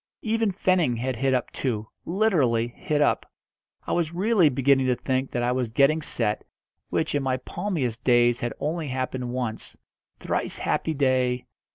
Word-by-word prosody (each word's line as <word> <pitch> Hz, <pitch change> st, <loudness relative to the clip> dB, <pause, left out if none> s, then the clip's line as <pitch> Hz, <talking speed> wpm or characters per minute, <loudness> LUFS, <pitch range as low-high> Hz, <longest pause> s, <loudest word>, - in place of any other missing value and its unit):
Even 225 Hz, -1 st, +1 dB
Fenning 180 Hz, -9 st, +1 dB
had 130 Hz, +2 st, -2 dB
hit 135 Hz, +3 st, +1 dB
up 125 Hz, -2 st, 0 dB
two 110 Hz, -5 st, -2 dB, 0.2 s
literally 160 Hz, -, +2 dB
hit 150 Hz, +4 st, -1 dB
up. -, -, 0 dB, 0.5 s
I -, -, -4 dB
was 170 Hz, -1 st, 0 dB
really 195 Hz, -3 st, +4 dB
beginning 135 Hz, 0 st, +3 dB
to 125 Hz, -, +3 dB
think 130 Hz, +1 st, -1 dB
that 120 Hz, -, -2 dB
I 120 Hz, -, +2 dB
was 125 Hz, -2 st, -1 dB
getting 140 Hz, +6 st, +3 dB
set, 105 Hz, -7 st, -1 dB, 0.5 s
which, 160 Hz, -1 st, -1 dB
in 145 Hz, -, +1 dB
my 130 Hz, -1 st, 0 dB
palmiest 130 Hz, -, -3 dB
days 120 Hz, -1 st, +4 dB
had 120 Hz, -, -2 dB
only 155 Hz, +1 st, -2 dB
happened 130 Hz, -1 st, -3 dB
once 120 Hz, -3 st, -4 dB, 0.4 s
thrice -, -, -2 dB
happy 160 Hz, -, -1 dB
day! 130 Hz, -2 st, +1 dB
130 Hz, 165 wpm, -25 LUFS, 125-160 Hz, 0.5 s, really